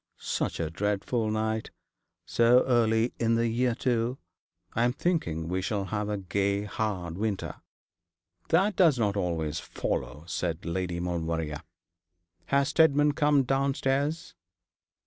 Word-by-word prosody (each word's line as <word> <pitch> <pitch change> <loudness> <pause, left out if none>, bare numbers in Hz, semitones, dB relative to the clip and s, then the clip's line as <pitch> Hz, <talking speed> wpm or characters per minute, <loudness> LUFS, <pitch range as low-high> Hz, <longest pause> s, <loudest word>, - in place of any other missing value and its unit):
'Such - - -2
a 80 -1 -2
dreadful 105 +4 -1
night. 110 0 -1 0.6
So 120 +2 +4
early 115 -2 +2
in 115 0 +2
the 115 0 +2
year, 120 +1 +1
too. 120 0 0 0.6
I'm 120 +2 +2
thinking 85 - -1
we 90 +2 -1
shall 100 0 -1
have 105 +2 -2
a 105 - -1
gay 100 +1 0
hard 95 -5 -3
winter.' 105 -2 -3 0.9
'That 195 +5 +3
does 165 -8 +5
not 105 -3 +1
always 80 -5 -1
follow,' 75 +2 -4
said 85 -1 -3
Lady 85 0 -2
Maulevrier. 80 -3 -2 0.9
'Has 140 0 +2
Steadman 150 -2 +4
come 145 -1 +3
downstairs?' 140 +4 0
110 Hz, 125 wpm, -28 LUFS, 90-130 Hz, 0.9 s, does